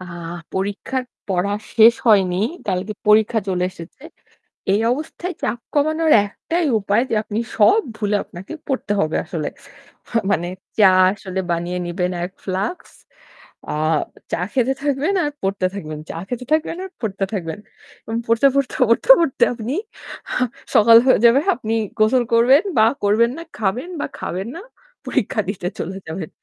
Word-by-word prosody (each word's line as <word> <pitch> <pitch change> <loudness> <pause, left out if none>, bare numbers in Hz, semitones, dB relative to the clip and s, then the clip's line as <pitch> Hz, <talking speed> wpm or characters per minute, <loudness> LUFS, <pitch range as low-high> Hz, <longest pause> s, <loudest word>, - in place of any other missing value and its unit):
আ - - -8 0.5
পরীক্ষার 205 +7 -2 0.2
পড়া 190 +1 0 0.2
শেষ 230 +1 +8
হয়নি 190 -5 +4 0.3
কালকে 190 +2 -1 0.2
পরীক্ষা 215 +2 +4
চলে 180 -1 0
এসেছে। 170 +8 -12 0.7
এই 205 - +3
অবস্থায় 320 +6 -5
চাপ 240 - -1 0.2
কমানোর 310 +2 +2
একটাই 330 - -2
উপায় 205 +3 +1
যে - - +1
আপনি 210 0 -4 0.2
সব 315 - +5 0.2
ভুলে 210 -1 0
আপনাকে 185 - -10
পড়তে 260 -6 -2
হবে 155 0 0
আসলে। 160 -2 -3 0.6
মা 235 - +1
মানে 175 -3 0 0.3
চা 195 -3 +7 0.2
আসলে 190 -2 -5
বানিয়ে 175 +1 -1
নিবেন 180 +1 -2
১ 180 - -6
ফ্লাক্স, 195 - -3 0.8
আ - - -2 0.6
চা - - -1
খেতে 260 0 +2
থাকবেন 290 +6 0
আর 295 - -1
পড়তে 195 -1 0
থাকবেন, 155 -6 -6
চা - - -5
খেতে 250 +2 -5
থাকবেন 315 +2 +1
আর 380 - -10
পড়তে 200 -3 -2
থাকবেন 165 -3 -4 0.4
এবং 225 0 -3
পড়তে, 230 +4 +4
পড়তে, 275 -2 0
পড়তে, 230 - +1
পড়তে 330 -6 +2
আপনি 235 +2 -4 0.6
আ - - -3 0.4
সকাল 230 +2 +8
হয়ে 260 - +5
যাবে। 235 +3 +6 0.2
আপনি 220 -3 -3 0.3
গোসল 240 +4 +4
করবেন 255 - +5
বা 220 - +6 0.2
করবেন 220 +4 +3
না, 335 - -6
খাবেন 220 - -1
বা - - -1
খাবেন 190 +4 -4
না, 340 - -7 0.4
পরীক্ষা 220 - 0
দিতে 185 -3 -3
চলে 190 +4 -4
যাবেন। 160 0 -5
215 Hz, 155 wpm, -20 LUFS, 190-255 Hz, 0.8 s, শেষ